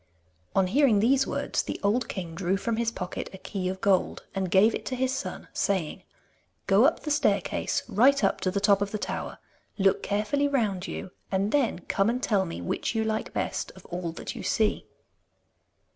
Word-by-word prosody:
On 195 Hz, -, +4 dB
hearing 245 Hz, +2 st, +4 dB
these 265 Hz, +5 st, +3 dB
words -, -, -1 dB
the -, -, -5 dB
old 230 Hz, +4 st, +1 dB
king 175 Hz, -4 st, -5 dB
drew 185 Hz, +2 st, 0 dB
from 225 Hz, +3 st, -2 dB
his 235 Hz, 0 st, +1 dB
pocket 180 Hz, -5 st, -5 dB
a -, -, -7 dB
key 185 Hz, -1 st, -3 dB
of 190 Hz, 0 st, -5 dB
gold, 195 Hz, -2 st, +1 dB
and 190 Hz, -2 st, -1 dB
gave 200 Hz, +5 st, +5 dB
it -, -, -4 dB
to 260 Hz, -, -2 dB
his 260 Hz, +1 st, 0 dB
son, 265 Hz, -, -5 dB
saying: 185 Hz, -6 st, -1 dB, 0.6 s
'Go 200 Hz, +6 st, +5 dB
up 315 Hz, -, +2 dB
the 300 Hz, -, -3 dB
staircase, 290 Hz, -, +1 dB
right 255 Hz, +6 st, +4 dB
up -, -, +2 dB
to 185 Hz, -, +1 dB
the 200 Hz, +2 st, 0 dB
top 200 Hz, 0 st, +4 dB
of 200 Hz, -, 0 dB
the 215 Hz, -, -3 dB
tower. -, -, -4 dB, 0.4 s
Look 195 Hz, -2 st, +3 dB
carefully 215 Hz, +8 st, 0 dB
round 210 Hz, -9 st, 0 dB
you, 185 Hz, -, -6 dB, 0.2 s
and 195 Hz, +2 st, +1 dB
then 260 Hz, -10 st, +1 dB
come 195 Hz, +3 st, +2 dB
and 240 Hz, -, +1 dB
tell 195 Hz, -4 st, +2 dB
me 125 Hz, -, -6 dB
which 85 Hz, -, -2 dB
you 220 Hz, -, +2 dB
like 220 Hz, 0 st, -2 dB
best -, -, -2 dB
of -, -, -15 dB
all 175 Hz, -1 st, -3 dB
that -, -, -6 dB
you -, -, -6 dB
see. 215 Hz, -1 st, 0 dB
205 Hz, 200 wpm, -27 LUFS, 190-235 Hz, 0.6 s, gave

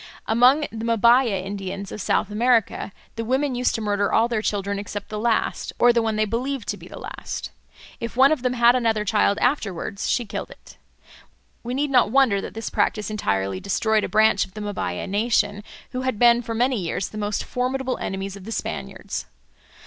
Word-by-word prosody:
Among 250 Hz, +6 st, +5 dB
the 225 Hz, 0 st, -6 dB
Mbaya 235 Hz, -4 st, +4 dB
Indians 195 Hz, 0 st, -5 dB
of 210 Hz, -, -6 dB
South 210 Hz, -, 0 dB
America 230 Hz, -2 st, +1 dB, 0.3 s
the 230 Hz, -, -2 dB
women 265 Hz, +4 st, 0 dB
used 250 Hz, 0 st, +1 dB
to 225 Hz, -, -3 dB
murder 205 Hz, -1 st, 0 dB
all 225 Hz, +1 st, +4 dB
their 230 Hz, -3 st, -1 dB
children 200 Hz, -1 st, -1 dB
except 205 Hz, 0 st, -6 dB
the 215 Hz, -, -4 dB
last, 230 Hz, 0 st, 0 dB
or 245 Hz, 0 st, +5 dB
the 235 Hz, -, +3 dB
one 220 Hz, -1 st, -1 dB
they 215 Hz, 0 st, +2 dB
believed 245 Hz, +3 st, -3 dB
to -, -, -2 dB
be -, -, -12 dB
the -, -, -10 dB
last. -, -, -6 dB, 0.5 s
If 230 Hz, +1 st, -5 dB
one 270 Hz, +2 st, +6 dB
of 310 Hz, -, +1 dB
them 250 Hz, 0 st, 0 dB
had 240 Hz, 0 st, +5 dB
another 225 Hz, -4 st, +1 dB
child 205 Hz, -1 st, +2 dB
afterwards, 200 Hz, -, -1 dB
she 240 Hz, -, +1 dB
killed 220 Hz, -, -5 dB
it. -, -, -15 dB, 0.9 s
We 245 Hz, +2 st, -4 dB
need 285 Hz, +1 st, 0 dB
not 250 Hz, -5 st, +4 dB
wonder 240 Hz, -5 st, +3 dB
that -, -, -8 dB
this 225 Hz, 0 st, -5 dB
practice 210 Hz, -1 st, 0 dB
entirely 95 Hz, -, -1 dB
destroyed 215 Hz, -, +1 dB
a -, -, -2 dB
branch 215 Hz, -1 st, +4 dB
of 190 Hz, 0 st, -11 dB
the 215 Hz, -, -6 dB
Mbaya 190 Hz, -, -3 dB
nation, 205 Hz, 0 st, +1 dB, 0.3 s
who 255 Hz, -, -3 dB
had 260 Hz, -4 st, -1 dB
been 240 Hz, +1 st, +5 dB
for 230 Hz, -1 st, -5 dB
many 250 Hz, +2 st, +2 dB
years 180 Hz, +1 st, -2 dB
the 215 Hz, -, -7 dB
most 205 Hz, 0 st, -1 dB
formidable 255 Hz, +1 st, -2 dB
enemies 195 Hz, 0 st, -4 dB
of 200 Hz, -, -11 dB
the 225 Hz, -, -7 dB
Spaniards. -, -, -5 dB
220 Hz, 200 wpm, -23 LUFS, 205-245 Hz, 0.9 s, one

